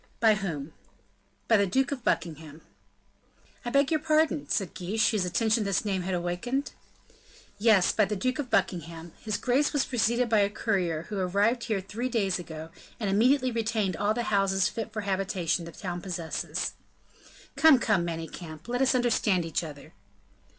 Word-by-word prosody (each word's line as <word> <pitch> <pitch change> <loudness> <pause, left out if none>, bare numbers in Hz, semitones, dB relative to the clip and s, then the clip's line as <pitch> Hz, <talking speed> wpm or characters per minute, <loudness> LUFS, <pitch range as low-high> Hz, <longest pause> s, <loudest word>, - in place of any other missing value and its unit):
"By 220 -2 +5
whom?" 165 -8 -4 0.7
"By 225 - +5
the 200 -1 +2
Duke 265 +7 +1
of 265 -4 -4
Buckingham." 160 -5 -2 1.0
"I 240 - -3
beg 275 +3 +2
your 310 - +3
pardon?" 310 -1 +1
said 195 -5 -1
Guiche, 210 +4 +1
whose 210 -5 0
attention 220 +4 +1
this 200 0 0
name 195 -3 0
had 185 +1 -2
awakened. 180 +11 -2 0.9
"Yes, 210 -4 +5
by 215 - +3
the 210 +2 -3
Duke 255 +7 -1
of 270 -4 -3
Buckingham. 170 -5 -1
His 215 -2 -2
Grace 265 +5 +1
was 285 -2 +2
preceded 240 0 +1
by 220 -2 +3
a 200 0 +3
courier, 185 -7 -1
who 205 -2 -3
arrived 205 +6 +1
here 210 -4 -1
three 230 +6 -4
days 195 -6 0
ago, 160 -1 -8 0.3
and 205 -4 -1
immediately 255 +5 +3
retained 220 -4 -1
all 205 +1 0
the 240 - -1
houses 195 -3 +2
fit 225 -1 -5
for 215 -1 -3
habitation 190 -4 -1
the 170 - -8
town 175 -1 -5
possesses." 170 -3 -3 0.8
"Come, 315 -4 +7
come, 210 -7 +1
Manicamp, 165 0 -6
let 245 +2 -1
us 265 0 +3
understand 220 -7 +2
each 165 +1 -1
other." 145 -3 -10
205 Hz, 170 wpm, -28 LUFS, 180-235 Hz, 1.0 s, Come